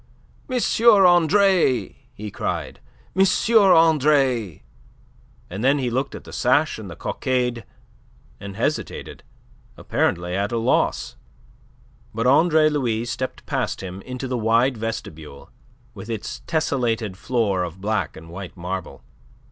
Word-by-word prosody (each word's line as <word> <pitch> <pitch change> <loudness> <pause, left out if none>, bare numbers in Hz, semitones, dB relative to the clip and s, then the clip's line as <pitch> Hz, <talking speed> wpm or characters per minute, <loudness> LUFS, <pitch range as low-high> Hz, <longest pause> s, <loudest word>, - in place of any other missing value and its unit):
"M. 255 -1 0 0.3
Andre!" 180 - +4 0.2
he 105 -3 -8
cried. - - -4 0.4
"M. 190 - +5 0.3
Andre!" 150 - +4 0.8
And 95 +5 -6
then 135 +3 +4
he 125 -3 -2
looked 130 +3 -2
at - - -9
the - - -12
sash 130 +2 +1
and 105 -3 -8
the 85 - -8
cockade, 125 +1 -2 0.8
and 100 -1 -8
hesitated, 125 +8 -3 0.6
apparently 85 +1 -1
at 100 +2 -1
a 120 - -1
loss. 115 - 0 1.0
But 115 +2 -1
Andre 155 +4 +4
Louis 120 -7 -1
stepped 130 +2 -5
past - - -2
him 95 0 -7
into 130 +2 -6
the 125 -1 -2
wide 115 +4 +2
vestibule, 80 -11 -7 0.4
with 105 0 -10
its 115 -2 -5
tessellated 120 - -1
floor 105 -3 0
of 90 +1 -5
black 100 -5 -2
and 80 - -12
white 95 +1 -8
marble. 90 +1 -6
120 Hz, 125 wpm, -22 LUFS, 100-140 Hz, 1.0 s, M